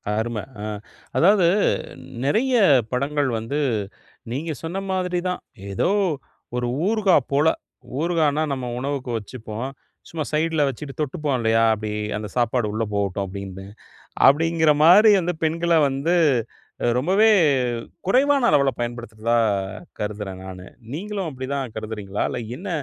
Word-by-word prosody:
அரும. 110 Hz, 0 st, -2 dB, 0.2 s
அ -, -, -5 dB, 0.5 s
அதாவது 190 Hz, 0 st, +5 dB, 0.8 s
நிறைய 245 Hz, -, +2 dB, 0.4 s
படங்கள் 140 Hz, +2 st, 0 dB
வந்து, 115 Hz, +7 st, -3 dB, 0.7 s
நீங்க 155 Hz, +6 st, -3 dB
சொன்ன 175 Hz, +4 st, -3 dB
மாதிரி 180 Hz, -1 st, 0 dB
தான். 180 Hz, -, -3 dB, 0.3 s
ஏதோ 95 Hz, -, +1 dB, 0.7 s
ஒரு 120 Hz, 0 st, -1 dB, 0.2 s
ஊறுகா 210 Hz, -4 st, +3 dB, 0.2 s
போல. 145 Hz, +3 st, +3 dB, 0.5 s
ஊறுகான்னா, 155 Hz, -3 st, +1 dB
நம்ம 130 Hz, -2 st, -4 dB
உணவுக்கு 135 Hz, -1 st, -3 dB
வச்சிப்போம். 110 Hz, +2 st, -6 dB, 0.4 s
சும்மா 160 Hz, -2 st, -3 dB
சைட்ல 160 Hz, 0 st, +1 dB
வச்சிட்டு 135 Hz, +2 st, -5 dB
தொட்டுப்போம், 150 Hz, -1 st, -1 dB
இல்லயா! 115 Hz, 0 st, +3 dB
அப்பிடி 110 Hz, 0 st, -4 dB, 0.3 s
அந்த 105 Hz, 0 st, -5 dB
சாப்பாடு 120 Hz, -1 st, +1 dB
உள்ளே 110 Hz, +1 st, -1 dB
போகட்டும், 100 Hz, -1 st, -1 dB
அப்பிடின்னு. 95 Hz, 0 st, -7 dB, 0.6 s
அப்பிடிங்கிறமாரி 165 Hz, +6 st, +5 dB
வந்து 175 Hz, 0 st, -2 dB
பெண்கள 170 Hz, +2 st, +1 dB, 0.2 s
வந்து 140 Hz, +6 st, 0 dB, 0.7 s
அ -, -, +2 dB
ரொம்பவே 190 Hz, +11 st, +3 dB, 0.8 s
குறைவான 270 Hz, +5 st, +3 dB
அளவுல 140 Hz, -1 st, +4 dB
பயன்படுத்துறதா 120 Hz, -1 st, -2 dB, 0.6 s
கருதுறேன் 105 Hz, -3 st, -5 dB
நானு. 95 Hz, -1 st, -9 dB, 0.3 s
நீங்களும் 195 Hz, +2 st, -4 dB
அப்பிடி 130 Hz, -2 st, -6 dB
தான் 135 Hz, -5 st, -3 dB
கருதுறீங்களா? 105 Hz, -2 st, -4 dB
இல்ல -, -, -3 dB, 0.2 s
என்ன? 195 Hz, +4 st, -7 dB
140 Hz, 120 wpm, -23 LUFS, 110-170 Hz, 0.8 s, அதாவது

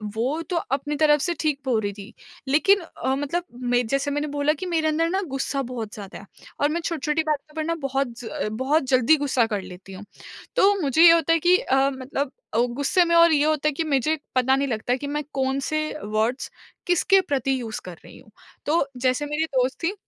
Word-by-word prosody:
वो 265 Hz, +8 st, -1 dB
तो 360 Hz, -, -2 dB, 0.2 s
अपनी 290 Hz, +2 st, -1 dB
तरफ़ 295 Hz, -1 st, +4 dB
से 345 Hz, -, 0 dB
ठीक 300 Hz, -3 st, 0 dB
बोल 245 Hz, -4 st, +1 dB
रही 205 Hz, -1 st, -3 dB
थी। 205 Hz, +3 st, -11 dB, 0.3 s
लेकिन 390 Hz, +9 st, +4 dB
अ, 265 Hz, -5 st, -3 dB
मतलब 270 Hz, -5 st, -2 dB
जैसे 275 Hz, +1 st, 0 dB
मैंने 290 Hz, +1 st, -1 dB
बोला 290 Hz, +1 st, 0 dB
कि 315 Hz, -, -7 dB
मेरे 330 Hz, -3 st, 0 dB
अंदर 325 Hz, +2 st, +1 dB
ना 380 Hz, +3 st, 0 dB
गुस्सा 275 Hz, +1 st, -2 dB
बहुत 225 Hz, -4 st, -5 dB
ज़्यादा 200 Hz, -3 st, -9 dB
है, 200 Hz, -, -13 dB, 0.3 s
और 290 Hz, -, +2 dB
मैं 340 Hz, +2 st, -2 dB
छोटी-छोटी 320 Hz, -1 st, -1 dB
बातों 305 Hz, 0 st, -3 dB
पर 315 Hz, -, -2 dB
ना 335 Hz, +1 st, -1 dB
बहुत 275 Hz, 0 st, 0 dB
ज़ 245 Hz, -, -9 dB
अ, -, -, -3 dB
बहुत 265 Hz, +8 st, 0 dB
जल्दी 255 Hz, +3 st, +5 dB
गुस्सा 265 Hz, -5 st, +1 dB
कर 205 Hz, -3 st, -2 dB
लेती 185 Hz, +1 st, -11 dB
हूँ। 190 Hz, +2 st, -10 dB, 0.5 s
तो 400 Hz, +1 st, +5 dB
मुझे 300 Hz, +2 st, +3 dB
ये 335 Hz, -, +10 dB
होता 330 Hz, 0 st, +3 dB
है 330 Hz, -, +2 dB
कि 355 Hz, +3 st, +4 dB
अ, 270 Hz, +1 st, +2 dB
मतलब 265 Hz, +1 st, -4 dB, 0.2 s
अ, -, -, 0 dB, 0.2 s
गुस्से 285 Hz, +7 st, +2 dB
में 335 Hz, 0 st, +2 dB
और 335 Hz, 0 st, +6 dB
ये 290 Hz, -1 st, +3 dB
होता 305 Hz, -1 st, +1 dB
है -, -, +3 dB
कि 325 Hz, -, -2 dB
मुझे 305 Hz, +1 st, +1 dB, 0.2 s
पता 255 Hz, +1 st, +3 dB
नहीं 275 Hz, +1 st, 0 dB
लगता 245 Hz, +1 st, -1 dB
कि 285 Hz, +2 st, -6 dB
मैं 295 Hz, +1 st, -2 dB
कौन-से 270 Hz, +3 st, -1 dB, 0.2 s
वर्ड्स 215 Hz, +4 st, -1 dB, 0.4 s
किसके 360 Hz, +2 st, +4 dB
प्रति 270 Hz, -6 st, -1 dB
यूज़ 220 Hz, -2 st, -5 dB
कर 175 Hz, -3 st, -9 dB
रही -, -, -13 dB
हूँ। 215 Hz, -, -20 dB, 0.3 s
तो 300 Hz, -1 st, +2 dB
जैसे 255 Hz, +3 st, 0 dB
मेरी 300 Hz, +2 st, -1 dB
दोस्त 260 Hz, -3 st, 0 dB
थी, 345 Hz, +4 st, 0 dB
285 Hz, 220 wpm, -24 LUFS, 255-315 Hz, 0.5 s, ये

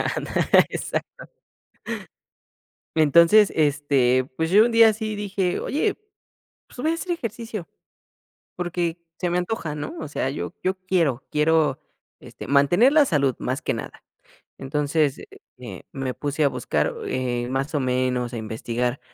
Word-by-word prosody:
Andale, -, -, +3 dB
exacto. -, -, -3 dB, 1.9 s
Entonces 170 Hz, +7 st, +5 dB
este, 140 Hz, -4 st, +2 dB
pues, 160 Hz, +1 st, -1 dB
yo 210 Hz, +3 st, +7 dB
un 240 Hz, -, 0 dB
día 230 Hz, -1 st, +7 dB
así 215 Hz, 0 st, -4 dB
dije, 195 Hz, -3 st, -1 dB
oye, 395 Hz, +8 st, 0 dB, 0.7 s
pues, -, -, -18 dB
voy 315 Hz, +5 st, +1 dB
a -, -, 0 dB
hacer 350 Hz, +1 st, -3 dB
ejercicio 230 Hz, -, -5 dB, 0.9 s
porque 175 Hz, -1 st, -2 dB, 0.2 s
se 180 Hz, -, -1 dB
me 175 Hz, -, 0 dB
antoja, 175 Hz, -5 st, -3 dB
¿no? 145 Hz, 0 st, -5 dB
O 155 Hz, -, -5 dB
sea, 130 Hz, -2 st, -2 dB
yo 145 Hz, -, -5 dB
yo 185 Hz, +1 st, +1 dB
quiero 175 Hz, -9 st, 0 dB
quiero 150 Hz, -2 st, +2 dB, 0.4 s
este -, -, -10 dB
mantener 175 Hz, -, +4 dB
la 300 Hz, -2 st, +6 dB
salud 140 Hz, -, +1 dB
más 130 Hz, +1 st, -2 dB
que -, -, -1 dB
nada, -, -, -8 dB, 0.6 s
entonces, 145 Hz, +1 st, 0 dB
eh -, -, -11 dB, 0.3 s
eh, 105 Hz, -7 st, -9 dB
me 135 Hz, -2 st, -3 dB
puse 145 Hz, +1 st, -1 dB
a 140 Hz, -, +4 dB
buscar, -, -, -1 dB
eh, 120 Hz, -1 st, -2 dB
más 135 Hz, +4 st, -2 dB
o -, -, +2 dB
menos 125 Hz, -1 st, 0 dB
a -, -, -3 dB
investigar 120 Hz, +4 st, -3 dB
155 Hz, 145 wpm, -23 LUFS, 135-190 Hz, 1.9 s, yo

